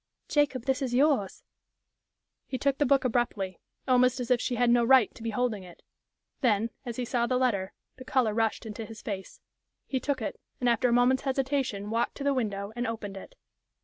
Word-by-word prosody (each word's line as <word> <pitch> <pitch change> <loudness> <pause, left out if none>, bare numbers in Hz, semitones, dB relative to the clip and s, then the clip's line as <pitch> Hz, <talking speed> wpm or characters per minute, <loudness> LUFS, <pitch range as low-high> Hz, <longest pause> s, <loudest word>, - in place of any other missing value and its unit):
"Jacob, 280 -5 +1
this 265 +1 0
is 250 -3 -1
yours." 270 -8 +2 1.0
He 260 - -3
took 275 +1 0
the 290 - +3
book 275 0 +3
abruptly, 220 -6 -1 0.3
almost 255 0 +4
as 245 0 -3
if 250 -1 +4
she 250 - -1
had 240 0 +3
no 240 0 +4
right 255 -3 +5
to - - -14
be 230 - -2
holding 225 -2 -1
it. 180 -2 -14 0.6
Then, 230 -3 +2 0.2
as 235 - -4
he 250 - -2
saw 240 -1 0
the 255 - +1
letter, 205 -7 0 0.3
the 255 - -9
color 250 -4 +1
rushed 225 +1 0
into 220 +1 -6
his 220 0 -10
face. 195 -3 -6 0.4
He 265 - -1
took 280 0 -1
it, 220 - -4 0.2
and 250 - 0
after 240 +1 +3
a - - +1
moment's 245 +2 +4
hesitation 265 -6 -1
walked 230 +1 0
to 280 - -6
the 280 0 +2
window 205 -5 -2
and 240 0 -2
opened 215 -3 -5
it. 195 - -10
245 Hz, 205 wpm, -28 LUFS, 220-260 Hz, 1.0 s, right